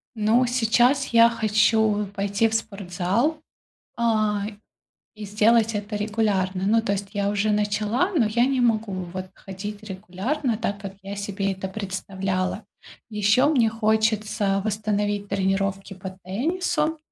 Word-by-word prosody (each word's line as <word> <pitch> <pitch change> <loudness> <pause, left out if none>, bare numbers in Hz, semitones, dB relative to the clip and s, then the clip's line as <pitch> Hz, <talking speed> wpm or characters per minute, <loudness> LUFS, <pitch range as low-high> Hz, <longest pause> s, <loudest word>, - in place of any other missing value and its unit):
Ну, 225 +4 +3
сейчас 245 +3 +3
я 230 0 +6
хочу 220 -1 +2
пойти 200 +2 +1
в 225 - -5
спортзал, 205 - -1 0.6
а, 215 -3 +1 0.7
и 210 - -7
сделать 220 +2 +3
это 210 +1 -4
регулярно. 205 -3 0
Ну, 225 +2 +3
то 220 - -2
есть 195 0 -4
я 200 -1 0
уже 205 +1 +1
начала, 210 - 0
но 265 -9 +3
я 235 +3 +2
не 265 -1 +1
могу, 225 -4 +1 0.2
вот, 185 0 -5
ходить 205 +2 -8
регулярно 215 +6 -3
так, 200 -2 -3
как 195 -1 -7
я 200 +1 -6
себе 200 -1 -2
это 190 0 -5
представляла. 190 0 -3 0.4
Ещё 210 +6 +3
мне 240 -7 +3
хочется 215 -2 +1
восстановить 205 -1 -1
тренировки 195 0 -1
по 190 0 -7
теннису, 315 - -1
210 Hz, 135 wpm, -24 LUFS, 195-225 Hz, 0.7 s, я